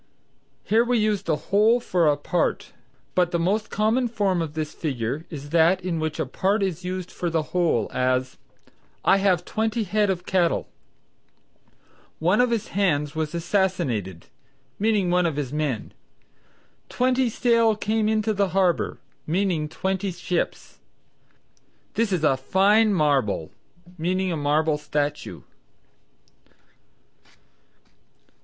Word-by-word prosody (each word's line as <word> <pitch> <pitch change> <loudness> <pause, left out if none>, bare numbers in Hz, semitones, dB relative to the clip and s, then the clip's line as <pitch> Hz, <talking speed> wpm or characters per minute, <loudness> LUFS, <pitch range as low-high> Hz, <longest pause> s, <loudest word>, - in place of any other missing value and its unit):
Here 225 +2 +3
we 245 0 +1
use 215 -2 +1
the 160 - 0 0.2
whole 215 +4 +4
for 180 -8 +1
a 145 -1 +3
part. 170 +4 -1 0.4
But 180 -1 +2
the 175 - 0
most 205 +5 0
common 220 +4 +1
form 200 -6 0
of 155 -2 -5
this 155 -1 -3
figure 140 +1 -3
is 145 -3 -8
that 170 +3 +4
in 170 -3 -1
which 155 -1 -3
a - - 0
part 195 +10 0
is 180 -2 -3
used 185 0 -4
for 175 - -3
the 160 -1 0
whole; 170 - +1
as, 130 0 0 0.7
"I - - +5
have 195 -3 +1
twenty 220 +1 -1
head 210 +1 +1
of 180 -2 -2
cattle," 180 -3 +1 1.5
"One 180 +8 +3
of 250 - +2
his 230 -3 -2
hands 150 -7 0
was 160 0 -3
assassinated," 165 - -1 0.5
meaning 205 -4 +1
one 180 -1 +3
of 160 - -2
his 145 -2 -3
men. 150 -7 -2 1.0
"Twenty 255 0 +1
sail 230 -1 +2
came 215 0 0
into 220 0 +1
the 200 -1 +1
harbor," 180 -3 +1 0.3
meaning 170 -3 0
twenty 190 +4 -2
ships. 175 0 -3 1.1
"This 225 -2 0
is 175 -4 0
a 145 -3 +4
fine 200 +10 +3
marble," 140 - +1 0.5
meaning 185 +3 0
a - - -1
marble 150 +1 +1
statue. 145 0 -3
180 Hz, 135 wpm, -24 LUFS, 155-210 Hz, 1.5 s, I